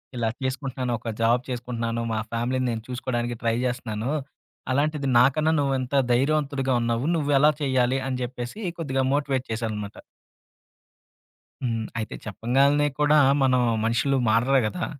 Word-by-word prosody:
ఇలా 115 -2 0
చేసుకుంటున్నాను. 130 -1 -2
ఒక 115 0 -4
జాబ్ 120 +2 +3
చేసుకుంటున్నాను. 115 -2 -3
మా 110 - 0
ఫ్యామిలీని 125 +2 -1
నేను 110 -1 -4
చూసుకోడానికి 120 -1 -3
ట్రై 115 -1 +1
జేస్తున్నాను. 120 -1 -3 0.6
అలాంటిది 145 +1 0
నాకన్నా 150 +5 +3
నువ్వు 140 -1 +1
ఎంత 130 +1 -5 0.2
ధైర్యవంతుడిగా 140 0 +1
ఉన్నావు. 115 +2 0
నువ్వు 145 -3 0
ఎలా 150 +2 +6
చేయాలి? 130 -2 +2
అని 130 -1 -2
చెప్పేసి 120 - -6 0.2
కొద్దిగా 135 -5 -1
మోటివేట్ 140 -3 0
చేశాననమాట. 110 -2 -4 1.7
హ్మ్. 115 -3 -1
అయితే 110 -1 -4
చెప్పంగాల్నే 135 +7 +2
కూడా 150 +1 +5 0.2
మనం 130 -1 +3 0.2
మనుషులు 120 +4 +1
మారరు 120 +5 +3
గదా! 175 +12 -3
125 Hz, 130 wpm, -25 LUFS, 115-140 Hz, 1.7 s, ఎలా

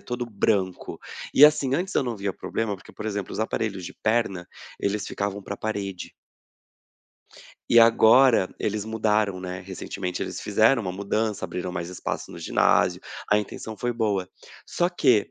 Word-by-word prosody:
todo 120 0 -4
branco. 100 -4 -1 0.3
E 145 - +8
assim, 145 -3 +4
antes 185 +2 -3
eu - - +3
não 120 -3 -3
via 100 -1 -2
problema, 110 +1 -3
porque, 95 - -13
por 110 - -7
exemplo, 100 -3 -3
os - - -5
aparelhos 110 -4 -2
de - - -8
perna, 110 -6 -1 0.3
eles 100 +1 -1
ficavam 100 0 -3
para 100 - -6
a - - -12
parede. 100 -4 -4 1.6
E 120 - +6
agora 115 -1 +6
eles 105 0 -2
mudaram, 105 -3 0
né. 90 0 -5
Recentemente 95 -1 -5
eles - - -5
fizeram 110 +4 +3
uma 90 -2 -3
mudança. 105 +2 -2
Abriram 90 0 -4
mais 85 -1 -4
espaço 90 - -5
no - - -9
ginásio. - - +2 0.3
A 105 - +5
intenção 110 +1 -6
foi 120 +3 -1
boa. 105 -5 -1 0.4
Só 175 - 0
que 125 - +2
105 Hz, 165 wpm, -25 LUFS, 95-115 Hz, 1.6 s, E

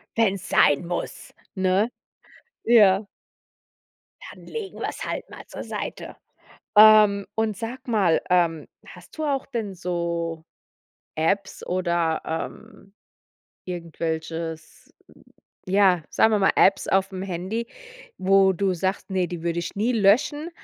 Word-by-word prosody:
Wenn 220 -4 +2
es 185 -2 -9
sein 145 +3 +3
muss, 175 0 -5 0.2
ne? 190 +4 +1 0.8
Ja. 205 -3 +5 1.3
Dann - - -16
legen 440 -4 -7
wir - - -2
es - - -6
halt - - -5
mal - - -11
zur - - -8
Seite. - - -6 0.6
Ähm, 210 -2 +7
und 220 -2 -1
sag 250 +3 -7
mal, 195 -8 +2
ähm, 170 -3 +1 0.2
hast - - -15
du 315 - -3
auch 275 -2 -1
denn 225 -7 -4
so 170 -2 -3 0.7
Apps 190 +5 -1
oder, 170 -3 0
ähm 195 +5 -7 0.8
irgendwelches, 165 -1 -5 0.7
ja, 190 -3 +3
sagen 220 - +3
wir 210 - +3
mal, 195 - +3
Apps 195 0 +4
aufm 195 -1 0
Handy, 195 +5 -4 0.5
wo 195 0 +4
du 190 +1 0
sagst: 190 +3 -3
„Ne, 185 -2 0
die 175 -1 -6
würde 170 0 -2
ich 170 - -4
nie 220 +5 +1
löschen.“ 255 - +2
190 Hz, 130 wpm, -24 LUFS, 170-215 Hz, 1.3 s, Ähm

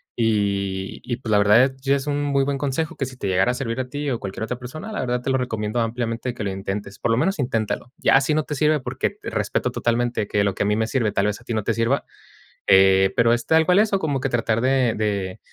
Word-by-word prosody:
Y 100 -4 -1
y 120 - -3
pues, 120 -3 -5
la 105 - +5
verdad 115 +6 +5
sí 135 0 -1
es 140 -1 0
es - - -12
un 145 0 0
muy 140 -1 +1
buen 140 0 -1
consejo, 150 +4 -2
que 135 - -1
si 130 0 -11
te 100 - -4
llegara 95 +3 +2
a - - -2
servir 125 -2 -3
a 130 0 -3
ti 145 +1 -3
o 120 - -2
cualquier 100 +2 -5
otra 120 +2 -4
persona, 155 - -8
la 215 - -4
verdad 125 -1 -1
te 135 - -1
lo 130 - +2
recomiendo 110 -2 -2
ampliamente 115 +1 -2
que 110 - -5
lo 100 - -2
intentes. 95 +1 -5
Por - - -1
lo 115 - +2
menos 190 +7 0
inténtalo. 120 -1 -2
Ya 135 - +4
si 145 +3 0
no 155 - +1
te 150 - -5
sirve, 150 +2 +2
porque, 130 - -3
respeto - - -1
totalmente 120 -2 -1
que 100 0 +1
lo 100 -1 +1
que - - -4
a - - 0
mí 105 - +2
me 110 +1 +1
sirve 110 -2 0
tal 100 - 0
vez 105 +2 -3
a - - -20
ti 120 - -3
no 110 - -1
te 115 - 0
sirva, 115 +5 0 0.6
eh, 95 0 +5
pero, 115 0 +4
es 120 0 -1
tal 160 0 +4
cual 180 0 +4
eso, 210 -2 +2
como 145 -6 -1
que 135 - -1
tratar 115 -2 0
de 130 -2 +2
de 100 -3 -2
120 Hz, 270 wpm, -22 LUFS, 105-135 Hz, 0.6 s, la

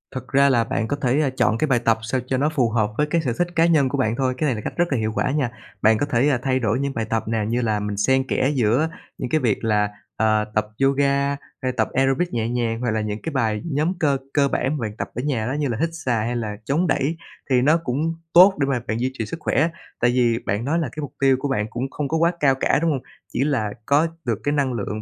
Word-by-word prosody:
Thật 130 0 -5
ra 140 +1 +4
là 120 -3 +3
bạn 115 0 -2
có 145 - -1
thể 140 +1 +1
chọn 110 - +2
cái 155 - 0
bài 125 -4 +3
tập 115 -1 +2
sao 125 +3 -1
cho 130 - 0
nó 145 +3 +2
phù 130 -7 +1
hợp 110 -2 0
với 150 - +2
cái 165 +2 +1
sở 130 -6 -1
thích 175 - +2
cá 165 0 +4
nhân 155 -6 +3
của 140 - -2
bạn 115 -4 +1
thôi. 130 0 0
Cái 155 - 0
này 130 - +1
là 105 - -5
cách - - -5
rất 175 - +3
là - - +1
hiệu 110 -1 -1
quả - - 0
nha. 140 -5 0 0.3
Bạn 110 0 +5
có 145 - 0
thể 135 0 +2
thay 130 0 +1
đổi 115 0 0
những 140 0 -2
bài 115 -3 -2
tập 110 0 -1
nè, 110 -1 0
như 120 +2 0
là 110 -3 0
mình 105 0 -3
xen 130 +5 +2
kẽ 135 - +1
giữa 125 +6 +2 0.3
những 125 - -4
cái 155 - +2
việc 115 -3 0
là, 105 -2 +2 0.3
à, 110 -1 +2
tập 105 0 +1 0.2
yoga, 140 +1 +2 0.3
hay 130 -1 0
tập - - +1
aerobic 135 +6 +1
nhẹ 115 -1 -1
nhàng 115 -2 -1
hoặc 120 -2 0
là 110 0 0
những 105 0 -4
cái 160 - -4
bài 110 -5 0
nhóm 155 +6 +1
cơ 140 -3 +2 0.2
cơ 140 -2 +3
bản 140 +2 -1
mà - - -6
bạn 105 -2 -4
tập - - -4
ở 125 - -2
nhà 125 -6 -1
đó, 130 - -1
như 145 0 -1
là 115 -3 -2
hít 165 - +2
xà 130 -7 -1
hay 115 +3 -2
là 110 -3 -3
chống 160 +8 +1
đẩy. 145 +4 0 0.3
Thì 125 -1 +4
nó 150 +5 +4
cũng 160 +1 -2 0.2
tốt 185 +3 +8
để 140 - +1
mà 130 -3 0
bạn 110 +1 -1
duy 130 +1 0
trì 115 -4 -4
sức 165 - -6
khỏe - - -2
á. 165 - +3 0.3
Tại 120 - +3
vì 120 -2 +2
bạn 100 +4 -1
nói 160 +5 +1
là 155 -6 -2
cái 155 - -6
mục 145 - -6
tiêu 135 -1 +4
của 145 - -2
bạn 125 -7 0
cũng 125 +4 -4
không 145 +1 -3
có 160 - 0
quá 165 +1 +3
cao 135 -4 +4
cả, 135 - +2
đúng 165 -1 +2
hông? 135 -4 -2 0.3
Chỉ - - +1
là 120 -8 0
có 145 +4 +3 0.2
được 115 -4 -1
cái 145 - +1
năng 140 -3 +1
lượng, 110 -1 -4
130 Hz, 290 wpm, -22 LUFS, 115-145 Hz, 0.3 s, tốt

